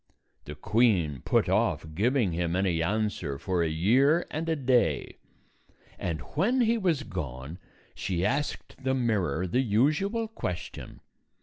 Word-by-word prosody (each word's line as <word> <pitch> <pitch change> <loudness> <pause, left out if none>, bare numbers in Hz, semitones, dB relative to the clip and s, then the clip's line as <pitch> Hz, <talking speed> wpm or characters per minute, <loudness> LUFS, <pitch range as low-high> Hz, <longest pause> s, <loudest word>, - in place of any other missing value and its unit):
The - - -7
queen 95 - +2
put - - +2
off - - +1
giving 115 - +1
him 85 0 -1
any 90 -3 +1
answer 95 -6 -1
for 90 +4 -1
a 85 - +2
year 130 - +3
and 165 +2 -3
a 160 - +2
day; 125 -5 +1 0.8
and 85 -3 -3
when 225 - +2
he 230 0 +3
was 175 -10 0
gone, 65 - -6 0.3
she 90 0 -2
asked 140 +2 -3
the 130 0 +1
mirror 95 - 0
the 110 +9 +1
usual 155 - +1
question. 90 - -6
110 Hz, 135 wpm, -28 LUFS, 85-145 Hz, 0.8 s, year